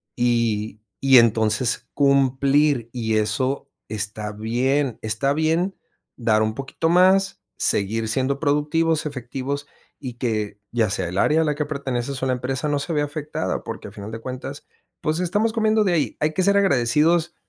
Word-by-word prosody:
Y 115 -3 0 0.2
y 135 -1 +6
entonces 110 +1 +1
cumplir", 140 -1 +2
y 110 -3 0
eso 130 +7 -1 0.2
está 105 0 -3
bien, 125 +5 0
está 110 +6 0
bien 160 +5 0 0.4
dar 110 -3 +2
un 110 0 -1
poquito 135 +4 -3
más, 190 +3 +4 0.2
seguir 110 +3 0
siendo 135 +3 0
productivos, 150 +2 +1
efectivos 140 +1 -4 0.3
y 125 -3 -7
que 110 -4 -2
ya 115 -3 +1
sea 95 -3 -2
el 90 - -5
área 155 +7 +3
a - - +3
la 150 - +1
que 150 - -2
perteneces 135 -3 -3
o - - +1
la 130 - +1
empresa 130 +3 -2
no 145 -1 +1
se 165 +3 -4
vea 150 -1 +1
afectada, 150 +1 -4
porque - - -7
a - - -15
final 105 +2 -8
de 115 - -6
cuentas, 130 +3 -7 0.4
pues 155 +2 0
estamos 210 +6 +1
comiendo 220 -1 +2
de 185 -4 +1
ahí. 145 -9 0
Hay 155 +1 0
que 185 - +1
ser 200 +1 +4
agradecidos, 160 0 +2
135 Hz, 170 wpm, -22 LUFS, 115-150 Hz, 0.4 s, y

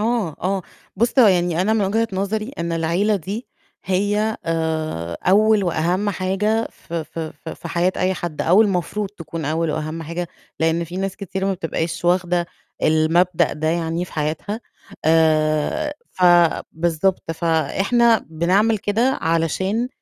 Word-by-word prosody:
آه، 220 -7 0
آه، 190 +1 0 0.3
بُص، 235 +6 +1
هو 240 - +8
يعني 175 -3 +2
أنا 205 +4 +2
من 220 -2 +2
وجهة 225 +4 +1
نظري، 215 +5 -2
إن 170 0 -2
العيلة 170 +6 +1
دي 200 +7 -5 0.4
هي 205 +4 0
آآ، 160 - -2
أول 210 +2 +4
وأهم 175 +4 0
حاجة 200 +4 0
ف - - -18
ف 165 0 -5
ف 160 0 -6
في 170 - -7
حياة 175 +2 +1
أي 185 +1 +1
حد، 175 -4 -4
أو 185 +6 +5
المفروض 200 +1 -1
تكون 165 -5 -7
أول 160 +2 0
وأهم 155 +2 -3
حاجة، 170 +2 -4 0.3
لأن 165 +1 +1
في 175 +2 -8
ناس 195 0 -2
كتير 195 -1 -4
ما 195 - +1
بتبقاش 165 -1 -3
واخدة 175 0 +2 0.4
المبدأ 160 +3 +3
ده 155 +1 -2
يعني 165 +1 -1
في - - -14
حياتها. 155 +8 -3 0.4
آآ، 160 - +2 0.2
ف 185 - -6 0.5
بالضبط، 170 +2 0
فإحنا 195 - +2
بنعمل 190 +7 +2
كده، 230 +7 +1
علشان 185 +8 0
175 Hz, 145 wpm, -21 LUFS, 165-205 Hz, 0.5 s, هو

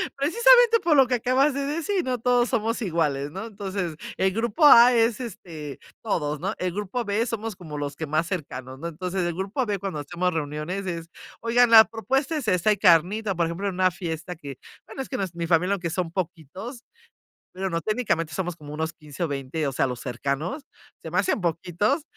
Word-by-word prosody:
precisamente 470 - +5
por 335 -4 +3
lo 265 -2 +6
que 250 - +1
acabas 255 +4 +2
de 280 +1 -2
decir: 335 +6 -1
"No 250 -2 -1
todos 245 0 +3
somos 230 0 -1
iguales", 150 -7 -1
¿no? 195 +6 -6
Entonces, 195 -6 -4 0.2
el 190 0 +1
grupo 235 +7 +1
A 245 -3 +9
es, 230 0 +2
este, 165 - -8 0.2
todos, 150 -9 -1
¿no?, 190 +6 -2
el 180 -1 -2
grupo 210 +5 -3
B, 210 +2 0
somos 225 -3 -4
como 155 -5 -8
los 145 -1 -4
que 160 - -4
más 155 +3 0
cercanos, 130 -7 -5
¿no? 170 - -4
Entonces 180 +3 -3
el 175 -1 -1
grupo 200 +8 -2
B 205 -2 -1
cuando 190 -5 -4
hacemos 175 +5 -2
reuniones 155 +5 -3
es: 170 -2 -5 0.3
"Oigan, 240 +1 +4
la 220 -1 +10
propuesta 270 - -1
es 255 -7 -5
esta, 185 +2 +2
hay 210 - +3
carnita", 190 +4 +3
por 170 -1 +1
ejemplo, 170 +5 -3
en 195 - -2
una 185 0 +2
fiesta 170 -2 -5
que 140 -5 -9 0.3
bueno, - - -6
es 265 - -7
que 260 - -3
no 195 - -1
es 175 -2 -12
mi 170 -1 -3
familia, 180 +3 +3
aunque 175 -4 -2
son 175 0 -2
poquitos 185 - -6 0.7
bueno, 190 0 -3
no 165 0 -1
técnicamente, 170 -7 -1
somos 175 +1 -3
como 150 -2 -9
unos 160 +2 -2
15 150 +1 -7
o - - +1
20, 140 +2 -3
o 140 - 0
sea, 130 - +1
los 125 -1 -5
cercanos, 140 - -3 0.4
se 160 - -7
me 175 - -2
hacen 195 +2 +1
poquitos 175 - 0
185 Hz, 210 wpm, -25 LUFS, 160-230 Hz, 0.7 s, la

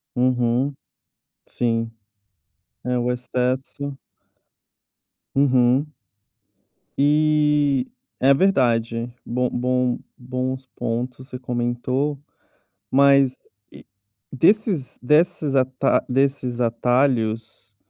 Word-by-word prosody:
Uhum. 125 +2 +1 0.7
Sim, 115 -1 -1 0.9
é 125 0 0
o 120 +1 0
excesso. 130 +3 -3 1.4
Uhum. 135 +1 +3 1.1
E, 150 -2 +2 0.3
é 135 +2 +5
verdade, 120 -8 +1
bom 125 +1 -1
bom 125 0 0 0.2
bons 130 +1 -4
pontos, 125 +3 -4
você 125 - -7
comentou, 125 +3 -2 0.7
mas, 140 -1 +4 0.4
eh, - - -13 0.5
desses 175 - +1
desses 150 +1 +2
ata 130 0 +2
desses 130 -2 0
atalhos, 115 -3 0
130 Hz, 75 wpm, -22 LUFS, 120-140 Hz, 1.4 s, é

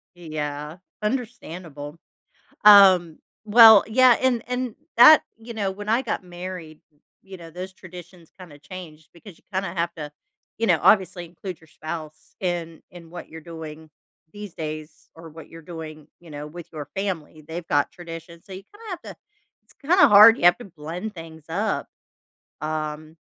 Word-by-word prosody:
Yeah, 150 -1 -6 0.2
understandable. 180 - -5 0.7
Um, 190 -5 +7 0.3
well, 220 -1 +8
yeah, 250 +1 +5
and 250 -3 +1
and 250 -2 -3 0.2
that 305 +6 +9
you 230 +1 -10
know, 200 -3 -2
when 205 +2 -8
I 235 +4 +2
got 220 -5 -4
married, 175 -3 -9 0.4
you 190 -1 -11
know, 165 -1 -12
those 185 +3 -8
traditions 175 -2 -14
kinda 160 -6 -13
changed 160 -2 -11
because 175 0 -15
you - - -30
kinda 190 -2 -2
have 170 0 -1
to, 150 -2 -8 0.5
you 230 - 0
know, 175 -4 +3
obviously 185 -3 +3
include 175 +1 -9
your 160 - -21
spouse 155 -1 -9
in 170 -3 -4
in 170 -2 -14
what 175 0 -9
you're 160 0 -11
doing 160 -1 -10 0.4
these 205 -3 -10
days 155 -1 -8
or 165 0 -12
what 160 +1 -13
you're 165 - -12
doing, 155 -2 -10
you 170 -2 -16
know, 145 0 -7
with 170 +2 -11
your 150 -3 -7
family. 165 -6 -4
They've 165 +1 -7
got 145 -2 +1
traditions, 165 -1 -11
so 195 - -12
you 190 +1 -8
kinda 435 - -16
have 360 - -6
to - - -38 0.5
it's - - -24
kinda 355 +6 +4
hard, 215 +3 +8
you - - -4
have 175 +4 +6
to 245 - -10
blend 175 +4 -7
things 160 -2 -11
up, 200 +7 -2 0.7
um, 155 +1 -5
175 Hz, 165 wpm, -23 LUFS, 160-200 Hz, 0.7 s, that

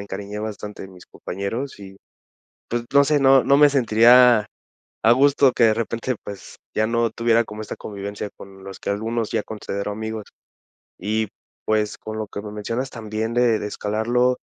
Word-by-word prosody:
me - - -5
encariñé 100 +1 -6
bastante 105 -1 -6
de 95 - -9
mis 90 -2 -15
compañeros 110 +9 -5
y, 95 -1 -11 0.7
pues, 120 0 -2
no 140 0 +7
sé, 145 0 +2
no 135 -1 +6
no 140 - +5
me 150 0 +7
sentiría 120 -2 +6 0.6
a 115 - +6
gusto 140 +1 +4
que 120 - +4
de 110 - +4
repente, 115 +3 -2
pues, 100 -1 -9 0.2
ya 110 0 +1
no 115 0 +1
tuviera 115 0 +2
como 105 0 -8
esta 110 - -6
convivencia 100 0 -6
con 95 -1 -13
los 95 -1 -9
que - - -5
algunos 110 +2 -2
ya - - 0
considero 105 -1 -5
amigos. 110 0 -5 0.7
Y, 110 +2 -1 0.4
pues, 105 -1 0
con 110 0 -7
lo 110 - -3
que 100 - -7
me 105 - -7
mencionas 115 +5 -3
también 110 -1 -4
de 120 -2 +3
de 105 - -4
escalarlo, 120 +5 0
110 Hz, 180 wpm, -22 LUFS, 105-120 Hz, 0.7 s, no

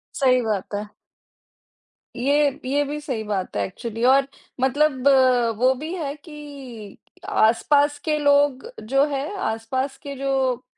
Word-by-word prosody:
सही 255 -2 +3
बात 210 -3 -3
है। 205 +1 -5 1.3
ये 280 +2 +1
ये 285 +3 +1
भी 295 +1 -4
सही 250 -7 -4
बात 200 -3 -3
है 100 - +1
एक्चुअली 230 - -6
और 270 +1 +5 0.3
मतलब 270 0 +2 0.5
वो 255 +3 +4
भी 310 +6 -6
है 290 -5 -3
कि 280 - -11 0.3
आस-पास 285 +6 +3
के 305 -1 +1
लोग 285 - +3 0.2
जो 275 +2 +4
है 275 0 -1 0.2
आस-पास 260 +4 -2
के 280 -1 -6
जो 265 -2 -1
270 Hz, 135 wpm, -23 LUFS, 240-285 Hz, 1.3 s, और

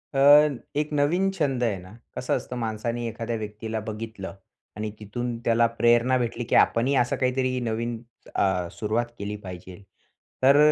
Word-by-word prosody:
अ, - - +2 0.6
एक 150 - -1
नवीन 170 +7 +2
छंद 140 -9 0
आहे 110 -4 +1
ना, 90 +2 -13 0.2
कसं - - 0
असतं 125 - -7
माणसाने 115 +1 -2
एखाद्या 115 +1 -3
व्यक्तीला 110 +1 -4
बघितलं 110 -3 -6 0.4
आणि 105 0 -3
तिथून 120 +3 -4
त्याला 115 0 +4 0.2
प्रेरणा 120 +2 +4
भेटली 120 0 -2
की - - +2
आपणही 130 +5 +4
असं 120 -1 +2
काहीतरी 130 0 0
नवीन 115 0 -2 0.3
अ, 90 -3 +1
सुरुवात 110 +3 -1
केली 105 +1 -3
पाहिजेल. 90 +1 -9 0.6
तर, 135 +2 +7
115 Hz, 150 wpm, -25 LUFS, 105-125 Hz, 0.6 s, तर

